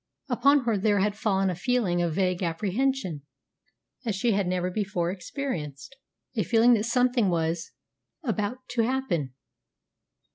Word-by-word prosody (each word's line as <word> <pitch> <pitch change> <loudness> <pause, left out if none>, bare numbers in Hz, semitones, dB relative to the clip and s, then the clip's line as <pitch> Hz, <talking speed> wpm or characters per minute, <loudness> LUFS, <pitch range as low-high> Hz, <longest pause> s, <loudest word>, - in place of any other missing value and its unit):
Upon 280 +3 +4
her 225 -4 +1
there 205 +1 +2
had 200 +1 +1
fallen 195 -3 +1
a - - -3
feeling 185 -3 +1
of 170 -2 0
vague 185 -1 +1
apprehension 190 - -1 0.8
such - - -13
as 210 - 0
she 230 +5 +1
had 200 -2 +1
never 180 0 -1
before 180 -4 -1
experienced, 180 - -5 0.4
a 220 - +1
feeling 235 +2 +5
that 215 -2 +2
something 245 -2 +2
was 165 -1 -1 0.5
about 230 +1 -2
to 245 -2 +1
happen. 225 - -1
205 Hz, 145 wpm, -27 LUFS, 180-245 Hz, 0.8 s, feeling